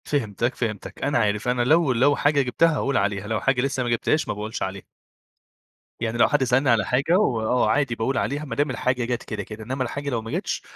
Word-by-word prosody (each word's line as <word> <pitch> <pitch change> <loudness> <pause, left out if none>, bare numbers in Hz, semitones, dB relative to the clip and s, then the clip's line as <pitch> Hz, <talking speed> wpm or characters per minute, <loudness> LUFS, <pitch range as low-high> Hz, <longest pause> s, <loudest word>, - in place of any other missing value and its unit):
فهمتك، 120 -3 -1
فهمتك 110 -4 -5
أنا 145 -2 +1
عارف، 105 0 0
أنا 125 0 +1
لو 155 +3 +3
لو 135 +5 +3
حاجة 145 0 +2
جِبتها 150 +6 +2
هاقول 140 -2 0
عليها، 100 0 -1
لو 110 0 -1
حاجة 135 -2 +2
لسه 130 -1 -1
ما 120 - -2
جِبتهاش 120 +6 +1
ما - - -1
باقولش 105 +2 -5
عليها. 95 0 -5 1.2
يعني 115 0 -2
لو 120 - +5
حد 145 -3 +2
سألني 130 +2 +2
على 115 -4 +3
حاجة 140 - +2
وآه 120 - +1
عادي 135 0 +1
باقول 120 +3 -1
عليها، 145 +3 -1
ما 140 - -5
دام 145 +1 +1
الحاجة 125 -1 -1
جات 120 0 -2
كده، - - -5
كده. 110 0 -9
إنما 130 +3 -2
الحاجة 140 +3 -4
لو 120 -4 -1
ما 115 - -8
جاتش - - -2
125 Hz, 225 wpm, -24 LUFS, 110-140 Hz, 1.2 s, لو